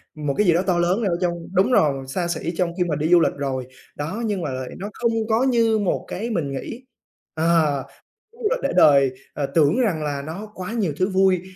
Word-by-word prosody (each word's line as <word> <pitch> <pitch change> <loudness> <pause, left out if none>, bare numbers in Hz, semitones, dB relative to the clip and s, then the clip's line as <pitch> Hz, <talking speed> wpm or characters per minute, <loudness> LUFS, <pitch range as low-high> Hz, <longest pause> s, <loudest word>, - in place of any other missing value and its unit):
một 150 -2 -2
cái 210 - +3
gì 170 - +6
đó 175 - +2
to 175 -2 +2
lớn 180 +6 +1
ở 175 -4 +1
trong 175 -1 +1 0.2
đúng 195 +7 +3
rồi, 135 - +2
xa 170 +6 -2
xỉ 170 0 -3
trong 175 -2 0
khi 180 - +2
mà 165 -4 -1
đi 155 +3 -1
du 175 - +7
lịch 165 - +2
rồi. 130 -3 -3 0.3
Đó, 165 +11 -4
nhưng 205 -4 -1
mà 150 - -3
lại 130 0 -5
nó 200 +3 -5
không 235 -1 0 0.2
có 225 +3 +3
như 230 -4 +3
một 200 -3 -1
cái 225 +6 -4
mình 165 -11 -2
nghĩ. 230 - -6 0.5
Ờ, 160 -4 +2 0.5
chuyến 465 - -18
du - - +3
lịch - - +1
để - - +1
đời, 140 -3 +6 0.2
ờ, 145 - -2
tưởng 150 - +2
rằng 185 -11 +1
là 145 -1 -2
nó 185 +9 -7
quá 185 +3 -6
nhiều 200 -10 -1
thứ 185 +3 +1
vui 190 -1 +3
175 Hz, 240 wpm, -22 LUFS, 150-210 Hz, 0.5 s, du